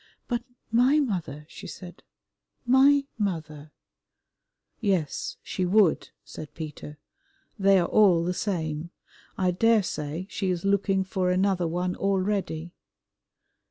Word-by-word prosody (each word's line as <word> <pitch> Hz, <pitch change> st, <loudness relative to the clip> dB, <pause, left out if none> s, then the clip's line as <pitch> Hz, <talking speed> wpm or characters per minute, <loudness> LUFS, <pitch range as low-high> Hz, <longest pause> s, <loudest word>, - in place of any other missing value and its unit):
"But 240 Hz, -1 st, -1 dB, 0.3 s
my 250 Hz, +6 st, +4 dB
mother," 170 Hz, -, -3 dB
she -, -, -10 dB
said, 175 Hz, -2 st, -10 dB, 0.6 s
"my 275 Hz, +3 st, +5 dB
mother" 155 Hz, -6 st, -3 dB, 1.1 s
"Yes, 190 Hz, -, -1 dB
she 185 Hz, -, -3 dB
would," 185 Hz, -1 st, +3 dB
said 155 Hz, -, -10 dB
Peter, 150 Hz, -1 st, -8 dB, 0.6 s
"they 195 Hz, 0 st, +5 dB
are 175 Hz, -2 st, +2 dB
all 185 Hz, -6 st, +4 dB
the 180 Hz, +1 st, -1 dB
same. 165 Hz, -5 st, -3 dB, 0.5 s
I 185 Hz, -1 st, +2 dB
daresay 185 Hz, -6 st, +1 dB
she 195 Hz, -2 st, -3 dB
is 180 Hz, 0 st, -2 dB
looking 195 Hz, -1 st, +2 dB
for 185 Hz, -1 st, -1 dB
another 185 Hz, -1 st, +1 dB
one 180 Hz, +2 st, -2 dB
already." 190 Hz, -4 st, -1 dB
185 Hz, 115 wpm, -26 LUFS, 165-200 Hz, 1.1 s, my